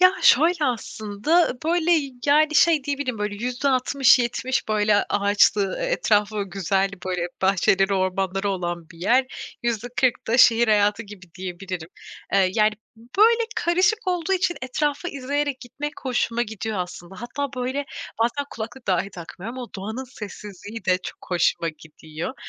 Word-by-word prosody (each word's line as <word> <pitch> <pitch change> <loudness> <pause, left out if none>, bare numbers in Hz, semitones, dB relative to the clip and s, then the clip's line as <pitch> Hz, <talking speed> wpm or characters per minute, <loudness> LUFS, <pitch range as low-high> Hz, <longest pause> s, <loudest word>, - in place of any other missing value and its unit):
Ya, 365 0 +7
şöyle 320 +4 +5
aslında, 245 - 0
böyle, 345 +1 +2 0.3
yani, 305 +2 +4
şey 310 -3 +4
diyebilirim 280 -5 -2
böyle 210 0 -3
%60-70 255 -1 +2
böyle 210 -1 +3
ağaçlı, 200 -1 +2
e - - -1
etrafı 210 - +1
güzel 195 +1 0 0.2
böyle 180 -2 -1 0.2
bahçeleri, 195 +1 +3
ormanları 190 +1 -1
olan 175 -3 -4
bir 165 - -14
yer. 250 +8 +3 0.4
%40 240 +2 0
da 235 +2 +1
şehir 235 -2 +6
hayatı 210 +1 +3
gibi 190 -5 -14
diyebilirim, 185 -2 -6 0.4
eee, 190 -2 +4
yani, 215 -1 +4 0.5
böyle 465 +2 +6
karışık 365 +5 +2
olduğu 360 0 0
için 360 -2 +1
etrafı 290 +5 -1
izleyerek 285 -1 -2
gitmek 290 +5 -6
hoşuma 240 -2 0
gidiyor 220 -2 -4
aslında. 180 0 -6
Hatta 280 +4 -3
böyle 260 +3 -2 0.4
bazen 260 +5 -1
kulaklık 235 +3 -7
dahi 190 +1 0
takmıyorum 190 +6 -8
ama 245 -2 -6
doğanın 220 +7 -5
sessizliği 210 -3 -9
de 185 -1 +3
çok - - -8
hoşuma 170 -1 +1
gidiyor. 160 - -8
225 Hz, 135 wpm, -23 LUFS, 195-275 Hz, 0.5 s, Ya